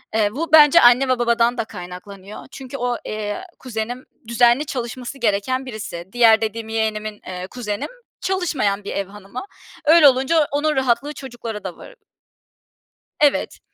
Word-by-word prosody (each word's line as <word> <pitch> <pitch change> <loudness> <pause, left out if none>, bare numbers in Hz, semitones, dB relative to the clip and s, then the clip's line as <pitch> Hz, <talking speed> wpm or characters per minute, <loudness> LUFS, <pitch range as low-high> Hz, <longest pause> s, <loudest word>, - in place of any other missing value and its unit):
Eee, 215 -2 +3
bu 310 +7 -4
bence 310 +2 +8
anne 245 +3 +6
ve 255 -1 +2
babadan 235 0 +2
da 230 - -1
kaynaklanıyor 185 +2 -10
çünkü 270 0 -8
o, 245 -1 -1
eee, 215 - -4 0.2
kuzenim 245 0 -5 0.2
düzenli 240 +4 +3
çalışması 250 0 -5
gereken 240 +3 0
birisi. 215 -8 -7
Diğer 230 -2 +5
dediğim 220 0 -3
yeğenimin, 215 -1 -2
eee, 185 0 -6
kuzenim 210 -3 -5 0.3
çalışmayan 295 - -1
bir 200 - -6
ev 200 -1 -2
hanımı. 205 +4 -9 0.4
Öyle 315 0 +7
olunca 275 +4 +3
onun 300 +2 0
rahatlığı 265 +3 0
çocuklara 240 -6 -7
da 185 -2 -6
varı - - -13 1.2
Evet. 295 -2 +2
240 Hz, 145 wpm, -21 LUFS, 210-265 Hz, 1.2 s, bence